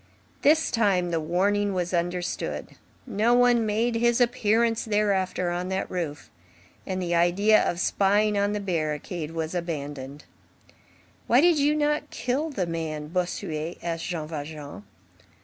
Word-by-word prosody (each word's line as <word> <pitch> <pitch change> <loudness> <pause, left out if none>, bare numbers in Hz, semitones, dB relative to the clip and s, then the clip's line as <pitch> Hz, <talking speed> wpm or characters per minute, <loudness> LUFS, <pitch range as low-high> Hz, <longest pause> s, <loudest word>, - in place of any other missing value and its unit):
This 315 +2 +4
time 195 -6 +2
the 165 - +1
warning 195 +5 +1
was 180 0 -2
understood. 175 +1 -2 0.4
No 230 +1 +2
one 245 -2 +4
made 225 +3 +1
his 235 +1 +2
appearance 230 -2 +2
thereafter 195 -4 0
on 180 +1 -3
that 190 0 -2
roof; 165 -5 -4 0.6
and 185 -1 -2
the 175 -2 -2
idea 180 +6 +4
of 175 - -1
spying 205 +3 +2
on 200 0 +1
the 210 - -1
barricade 160 -3 -3
was 160 0 -4
abandoned. 145 -5 -5 1.0
"Why 240 - +5
did 335 0 +4
you 290 +1 +3
not 300 0 0
kill 255 +7 -2
the 200 - -2
man?" 160 -3 -4
Bossuet 170 -2 -3
asked 165 -1 -3
Jean 160 -4 -3
Valjean. 150 - -7
185 Hz, 140 wpm, -26 LUFS, 165-225 Hz, 1.0 s, Why